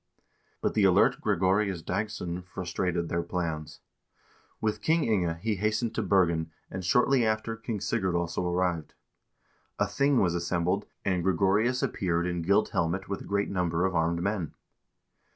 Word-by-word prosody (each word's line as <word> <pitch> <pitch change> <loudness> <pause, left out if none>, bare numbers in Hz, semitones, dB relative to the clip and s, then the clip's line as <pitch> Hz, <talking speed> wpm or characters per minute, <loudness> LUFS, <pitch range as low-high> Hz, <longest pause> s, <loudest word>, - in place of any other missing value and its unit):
2 - - -39 0.4
But - - 0
the 105 - +2
alert 95 0 +4
Gregorius 95 -2 +1
Dagss0n 90 -3 -3
frustrated 90 -2 -2
their 85 +1 -1
plans. 80 -4 -4 0.8
With 110 -1 -1
King 160 0 +2
Inge 90 -7 +1
he 110 -2 0
hastened 110 +3 0
to 110 - -1
Bergen, 85 -5 +2 0.2
and 95 0 -5
shortly 125 +7 +3
after 110 +1 0
King 115 -1 -4
Sigurd 95 -2 -1
also 85 +1 -1
arrived. 90 -3 -1 0.8
A - - +2
thing 140 -1 +2
was 90 -3 +2
assembled, 90 +3 -1 0.2
and 95 -3 +1
Gre 95 +1 +2
gorius 105 +8 +2
appeared 85 -2 0
in 90 -1 -2
gilt 100 +6 +2
helmet 85 +4 -1
with 100 - -3
a - - -9
great 100 0 -1
number 90 -2 0
of 95 - 0
armed 85 +1 +1
men. 100 -5 -2
95 Hz, 160 wpm, -28 LUFS, 85-105 Hz, 0.8 s, alert